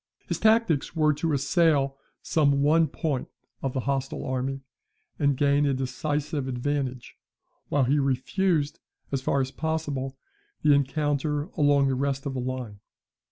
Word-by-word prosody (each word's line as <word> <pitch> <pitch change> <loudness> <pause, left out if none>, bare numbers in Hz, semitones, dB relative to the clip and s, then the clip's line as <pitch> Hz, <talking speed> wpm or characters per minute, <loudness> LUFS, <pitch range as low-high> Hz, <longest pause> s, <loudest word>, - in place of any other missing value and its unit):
His - - -3
tactics 220 -10 +2
were 155 -1 +3
to 160 +3 -1
assail 140 -1 +2 0.3
some 140 -3 +2
one 160 +2 +4
point 150 -7 -2 0.3
of 135 -2 -2
the 130 - -1
hostile 135 +1 -2
army, 130 +1 -2 0.6
and 140 -2 +2
gain 140 +1 +3
a 135 - +1
decisive 145 +2 -2
advantage; 130 0 -3 0.5
while 145 - +2
he 140 +4 +2
refused, 150 +4 0 0.3
as 135 -1 -1
far 135 +1 +1
as 130 0 -2
possible, 145 -4 -3 0.5
the 150 - +6
encounter 145 +1 0
along 145 -3 +4
the 135 - +1
rest 135 +1 -1
of 140 - -2
the 130 - -3
line. 125 -5 -4
140 Hz, 145 wpm, -26 LUFS, 135-150 Hz, 0.6 s, the